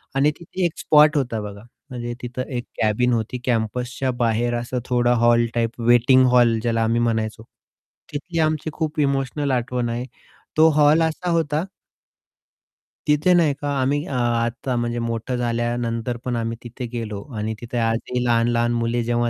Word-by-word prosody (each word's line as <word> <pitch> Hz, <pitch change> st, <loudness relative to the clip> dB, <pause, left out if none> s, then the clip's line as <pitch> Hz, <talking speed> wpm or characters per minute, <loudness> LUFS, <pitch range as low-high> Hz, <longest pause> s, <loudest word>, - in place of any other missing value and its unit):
आणि 145 Hz, +2 st, +3 dB
तिथे 175 Hz, +2 st, -3 dB
एक 170 Hz, -, -2 dB
स्पॉट 150 Hz, 0 st, +5 dB
होता 120 Hz, -5 st, -1 dB
बघा 100 Hz, 0 st, -8 dB, 0.3 s
म्हणजे 120 Hz, -1 st, -5 dB
तिथं 125 Hz, +1 st, -5 dB, 0.2 s
एक 120 Hz, -, -3 dB, 0.2 s
कॅबिन 120 Hz, +3 st, +2 dB
होती 115 Hz, +2 st, -2 dB
कॅम्पसच्या 125 Hz, +2 st, -1 dB
बाहेर 120 Hz, +1 st, +1 dB
असा 120 Hz, +2 st, -4 dB
थोडा 120 Hz, -1 st, +2 dB
हॉल 120 Hz, 0 st, +5 dB
टाइप 115 Hz, 0 st, -1 dB
वेटिंग 120 Hz, +2 st, +5 dB
हॉल 120 Hz, -2 st, +4 dB
ज्याला 115 Hz, -1 st, 0 dB
आम्ही 115 Hz, +1 st, +1 dB
म्हणायचो, 110 Hz, -1 st, -1 dB, 0.7 s
तिथली 165 Hz, +4 st, -4 dB
आमची 155 Hz, 0 st, 0 dB
खूप 155 Hz, -1 st, -2 dB
इमोशनल 140 Hz, 0 st, 0 dB
आठवण 125 Hz, -1 st, -1 dB
आहे. 120 Hz, +2 st, -3 dB, 0.5 s
तो 160 Hz, +1 st, +7 dB
हॉल 150 Hz, +2 st, +4 dB
असा 165 Hz, +2 st, -1 dB
होता 160 Hz, -1 st, 0 dB, 1.4 s
तिथे 150 Hz, +5 st, +4 dB
नाही 165 Hz, -5 st, +4 dB
का 145 Hz, -, -2 dB
आम्ही 145 Hz, +3 st, +1 dB
अ, 140 Hz, -, -6 dB
आता 120 Hz, +1 st, 0 dB
म्हणजे 120 Hz, 0 st, -1 dB
मोठं 115 Hz, +2 st, -3 dB
झाल्यानंतर 120 Hz, 0 st, -1 dB
पण 125 Hz, -1 st, -1 dB
आम्ही 115 Hz, 0 st, -2 dB
तिथे 125 Hz, +1 st, -7 dB
गेलो. 105 Hz, -4 st, -4 dB, 0.2 s
आणि 110 Hz, +1 st, -2 dB
तिथे 120 Hz, +1 st, -5 dB
आजही 115 Hz, +2 st, -1 dB
लहान-लहान 120 Hz, 0 st, +2 dB
मुले 115 Hz, 0 st, 0 dB
जेव्हा 120 Hz, 0 st, 0 dB
120 Hz, 160 wpm, -22 LUFS, 115-140 Hz, 1.4 s, तो